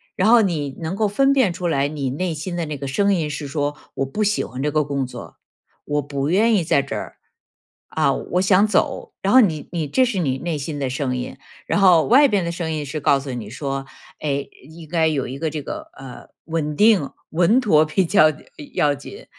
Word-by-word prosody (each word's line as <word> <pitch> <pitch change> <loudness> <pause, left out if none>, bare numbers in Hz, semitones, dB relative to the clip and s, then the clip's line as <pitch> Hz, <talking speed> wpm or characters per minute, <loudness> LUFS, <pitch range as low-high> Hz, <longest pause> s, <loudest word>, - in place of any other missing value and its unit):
然 - - +2
后 235 -1 +7
你 150 -8 -2
能 165 +3 -4
够 215 +1 +1
分 270 +7 +3
辨 260 -9 +3
出 180 +1 -6
来 140 -4 +1
你 145 -3 -3
内 170 +4 -2
心 165 +4 -5
的 170 -2 -2
那 150 -1 -4
个 140 0 -5
声 200 +8 +2
音 160 -4 -1
是 150 -1 -5
说： 145 +1 -2 0.2
“我 135 - -1
不 170 +11 -2
喜 210 0 +1
欢 125 - -7
这 150 - 0
个 150 +1 +1
工 140 -2 -2
作， - - -10 0.5
我 145 0 0
不 140 0 -3
愿 215 +6 +3
意 195 -5 +2
在 140 -3 +2
这 140 - -5
儿。 - - -7 0.7
啊， - - +1
我 180 - -2
想 190 +2 +4
走。 205 - -1
“然 195 - +2
后 260 - +9
你 160 - -1
你 165 -3 -2
这 255 - +2
是 230 -6 -2
你 135 -6 0
内 165 +1 -3
心 145 +1 -5
的 135 - -1
声 130 -1 -2
音。 125 - -6 0.3
然 - - +1
后 180 -5 +6
外 280 +4 +6
边 205 -7 +1
的 170 - -2
声 170 -1 -4
音 155 -2 -3
是 145 +3 -4
告 140 -1 +3
诉 135 0 -6
你 115 -4 -6
说： 135 +3 -4 0.4
“哎， 140 -2 -2 0.2
应 160 0 -12
该 165 0 +1
有 150 -4 -1
一 130 +2 -7
个 160 - -1
这 155 0 -5
个， - - -7
呃， 135 -2 -11 0.2
稳 155 -2 -2
定 205 -6 +4 0.2
稳 180 +9 +3
妥 155 -10 +4
比 180 +5 +1
较 165 -2 +5 0.5
要 145 -1 +3
紧。 405 - -11
155 Hz, 245 characters per minute, -21 LUFS, 140-190 Hz, 0.7 s, 后